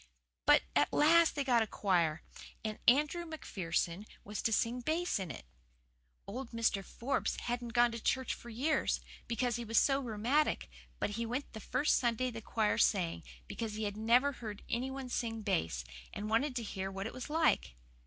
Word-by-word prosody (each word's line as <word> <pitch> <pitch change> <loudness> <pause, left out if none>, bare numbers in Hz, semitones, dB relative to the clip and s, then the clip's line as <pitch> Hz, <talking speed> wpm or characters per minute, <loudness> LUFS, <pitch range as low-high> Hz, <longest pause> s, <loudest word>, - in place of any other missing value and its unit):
But - - +7
at 145 +1 +3
last 330 +3 +5
they 285 - 0
got 245 -4 +3
a 220 - 0
choir, 170 -7 +1 0.4
and 215 -1 -3
Andrew 300 +7 +4
McPherson 195 - -3 0.2
was 210 0 -5
to 225 - +1
sing 230 +3 +1
bass 320 - 0
in 185 -3 -4
it. 125 - -8 0.8
Old 250 +4 -6
Mr. 225 -4 +1
Forbes 245 +7 -2
hadn't 240 -1 -3
gone 240 0 +5
to 230 - -5
church 260 +2 0
for 240 - -10
years, 270 +8 +1 0.3
because 240 0 0
he 240 - -4
was 225 0 -1
so 275 -1 +3
rheumatic, 250 +4 0 0.3
but - - -1
he 230 +3 -2
went 255 +5 -4
the 220 - -6
first 255 +7 +2
Sunday 245 +1 0
the 225 -1 -7
choir 220 -1 0
sang, 170 - +2 0.3
because 220 -2 -4
he 215 - -3
had 205 -1 -2
never 240 +6 +4
heard 215 -6 -7
any 250 +3 -1
one 265 -1 -5
sing 225 -3 -2
bass, 80 - 0 0.3
and 215 +1 -5
wanted 255 +4 +2
to 240 - -2
hear 195 -2 -4
what 195 0 -5
it 225 - -5
was 255 +3 -7
like. 305 - +2
230 Hz, 185 wpm, -33 LUFS, 210-260 Hz, 0.8 s, But